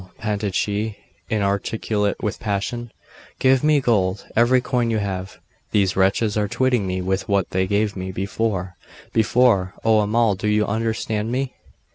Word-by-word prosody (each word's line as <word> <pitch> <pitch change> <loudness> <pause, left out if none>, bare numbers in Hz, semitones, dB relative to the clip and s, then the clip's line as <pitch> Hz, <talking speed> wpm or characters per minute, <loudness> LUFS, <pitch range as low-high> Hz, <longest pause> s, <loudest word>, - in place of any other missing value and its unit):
panted 105 -3 -2
she, 105 +2 -1 0.3
inarticulate 105 0 0
with 105 - -2
passion. 110 +3 -3 0.5
'Give 130 0 +3
me 150 -1 +4
gold 100 -7 +1
every 120 +3 +5
coin 120 -1 0
you 110 - +1
have. 95 -2 -4 0.3
These 95 -3 +2
wretches 100 +3 +2
are 105 -1 +1
twitting 125 -3 +1
me 90 0 -2
with 95 +2 -2
what 100 -2 +1
they 95 0 +1
gave 105 +1 0
me 95 0 -4
before 95 -1 -2 0.4
before 110 -4 +3
oh 110 -1 +5
Amal, 105 -1 +2
you 105 0 +2
understand 110 0 -2
me? 130 +1 -2
105 Hz, 145 wpm, -22 LUFS, 100-115 Hz, 0.5 s, every